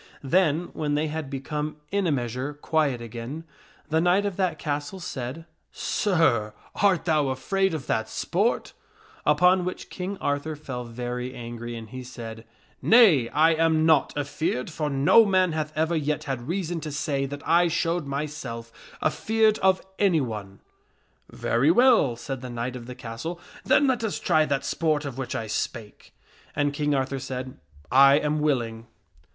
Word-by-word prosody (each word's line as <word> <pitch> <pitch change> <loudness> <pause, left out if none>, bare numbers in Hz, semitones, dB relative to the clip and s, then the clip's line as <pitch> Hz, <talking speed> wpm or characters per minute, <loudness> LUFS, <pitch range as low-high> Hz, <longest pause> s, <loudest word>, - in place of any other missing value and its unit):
Then, 165 +2 +2
when 150 -2 -1
they 150 +1 0
had 155 -2 -4
become 150 +2 -4 0.2
in 200 -2 +1
a - - +2
measure 130 +2 -2
quiet 145 -4 0
again, 120 +7 -6 0.5
the 160 +1 +2
knight 180 +4 +3
of 200 -3 -2
that 180 -5 0
castle 145 +4 -3
said, 155 -3 -5 0.2
" - - -49 0.2
Sir, 145 - +2 0.2
art 190 -5 +3
thou 155 -4 +2
afraid 175 +8 0
of 140 -5 -5
that 110 0 -1
sport? - - -1 0.3
" - - -26
Upon 180 +5 +5
which 180 +1 -5
King 190 +2 -4
Arthur 145 +1 -2
fell 130 -4 -6
very 125 +2 -5
angry 120 0 -6
and 115 -1 -8
he 130 0 -6
said, 115 -2 -9 0.2
" - - -35
Nay, 185 - +7
I 160 +2 +4
am 160 -1 +2
not 160 -3 +4
afeared, 145 -1 -2
for 150 -1 -2
no 140 +11 +6
man 185 -3 +3
hath 155 -1 -2
ever 160 +2 +1
yet 150 0 -1
had 135 -4 -4
reason 175 -1 -2
to 155 - -5
say 140 -2 -1
that 145 +1 -8
I 170 +2 +5
showed 170 -1 -1
my 140 +2 -2
self 115 -6 -7 0.3
afeared 220 +6 +2
of 190 0 +3 0.2
anyone." 115 - 0 0.4
" - - -41
Very 125 +6 +1
well," 225 - +5
said 130 +2 -6
the 130 - -6
knight 120 +1 -4
of 120 -2 -8
the 125 - -7
castle; 125 +8 -6
" - - -18
then 290 - +4
let 255 -4 +1
us 220 - -2
try 155 0 +3
that 140 -2 -1
sport 155 -2 0
of 135 -2 -6
which 130 - -4
I 115 - -2
spake." 110 0 -5 0.4
And 145 0 +1
King 145 0 0
Arthur 135 0 -1
said, 130 0 -6 0.2
" 75 - -27 0.2
I 135 - +6
am 150 +1 +1
willing." 120 -6 -1
150 Hz, 180 wpm, -25 LUFS, 125-165 Hz, 0.5 s, Nay